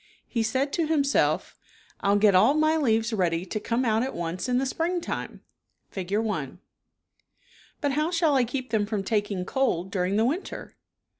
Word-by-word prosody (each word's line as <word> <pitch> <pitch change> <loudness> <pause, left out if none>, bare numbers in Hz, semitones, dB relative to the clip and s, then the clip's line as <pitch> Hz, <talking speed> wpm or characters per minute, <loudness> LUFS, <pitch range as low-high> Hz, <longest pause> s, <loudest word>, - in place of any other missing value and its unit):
He 235 - -1
said 260 +6 0
to 330 -3 0
himself, 290 -3 +1 0.2
" - - -29 0.2
I'll 200 0 +3
get 205 -1 +5
all 220 +10 +5
my 310 +1 +3
leaves 230 -6 +1
ready 175 -3 0
to 215 - -3
come 235 +4 -1
out 220 -1 +2
at 260 +2 -3
once 175 +6 -3
in 250 - +2
the 265 - +1
springtime 335 +6 -3 0.5
(Fig. 190 -1 -6
i). 210 -9 0 1.3
But 285 -2 +1
how 305 +4 0
shall 330 -3 +2
I 265 -2 +4
keep 250 +1 -4
them 210 -2 +1
from 210 -2 -2
taking 205 -3 -1
cold 190 -8 0
during 185 0 0
the 220 +2 +3
winter?" 320 +10 -4
225 Hz, 175 wpm, -26 LUFS, 200-275 Hz, 1.3 s, get